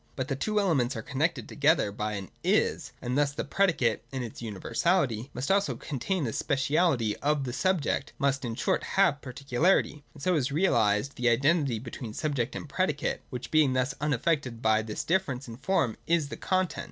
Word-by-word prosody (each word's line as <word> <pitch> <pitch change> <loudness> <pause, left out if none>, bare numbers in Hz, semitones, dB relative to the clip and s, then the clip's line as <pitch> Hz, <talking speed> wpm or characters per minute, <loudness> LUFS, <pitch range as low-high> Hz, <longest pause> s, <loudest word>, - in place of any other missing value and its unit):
But 130 +1 -3
the 135 - 0
two 210 +10 0
elements 140 -11 +1
are 110 - -5
connected 145 +7 -1
together 150 -7 +2
by 105 +1 -3
an 100 -2 -6
' - - -38 0.2
is - - -3
': - - -33
and 125 +1 -2
thus 145 0 +2
the - - -3
predicate 145 - +1
(in 130 -2 -3
its 115 -1 -8
universality) 120 - 0
must 130 +6 -2
also 200 +1 +2
contain 165 +5 -2
the 115 -4 -2
speciality 135 -5 +1
of 145 -1 0
the 125 -2 -4
subject, 170 -3 0
must, 140 -1 0
in 115 -2 -3
short, - - 0
have 180 -8 +2
particularity: 140 +4 0
and 145 - -11
so 185 - +2
is 140 -4 +1
realised 140 - +2
the 125 -1 +2
identity 135 +1 +2
between 115 -1 -7
subject 140 -7 -1
and - - -6
predicate; 150 -1 -1
which, 125 -3 -6
being 155 -4 +4
thus 130 +1 0
unaffected 145 -3 0
by 110 -1 +3
this 110 -1 -4
difference 145 -8 -1
in 115 -1 -8
form, 135 - 0
is 165 -4 +2
the - - -5
content. 185 -2 -1
140 Hz, 190 wpm, -28 LUFS, 120-160 Hz, 0.2 s, being